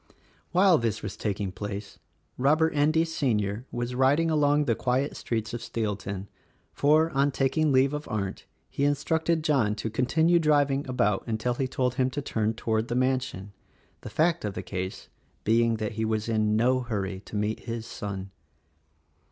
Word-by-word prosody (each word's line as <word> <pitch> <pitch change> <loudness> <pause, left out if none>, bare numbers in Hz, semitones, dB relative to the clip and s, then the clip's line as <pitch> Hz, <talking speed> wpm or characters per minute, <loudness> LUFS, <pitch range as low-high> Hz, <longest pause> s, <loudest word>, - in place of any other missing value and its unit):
While 180 -2 +5
this 115 -3 -2
was 105 - -5
taking 100 -2 -2
place, 100 +1 -6 0.4
Robert 155 +5 +3
Endy, 155 +3 +3
Sr., 115 -7 -1
was 120 +1 -3
riding 140 +6 +3
along 150 -1 +3
the 115 - +2
quiet 130 +5 0
streets 110 -1 -3
of 120 - -4
Steelton, 100 -3 -3 0.5
for, 155 +3 +3
on 140 +1 +2
taking 145 +3 +1
leave 135 +1 +4
of 150 0 -4
Arndt 100 -3 -4 0.2
he 140 - -3
instructed 160 +3 +1
John 130 -9 +2
to 110 +1 -4
continue 160 +9 +3
driving 145 -3 +2
about 120 -6 +1
until 115 +2 -1
he 130 +2 -1
told 125 -1 0
him 130 - +2
to 145 +3 -4
turn 110 -4 -1
toward 110 0 -1
the 120 - -2
mansion; 130 -6 -1 0.5
the - - -7
fact 170 +2 +1
of 105 -2 -3
the - - -4
case 95 0 -5 0.4
being 115 +1 +3
that 110 -1 -3
he 110 0 -3
was 110 0 -1
in 110 -2 +1
no 125 +4 +3
hurry 100 -6 -3
to - - -9
meet 105 +1 -1
his 115 -1 -4
son. 100 -3 -6
120 Hz, 170 wpm, -27 LUFS, 105-145 Hz, 0.5 s, While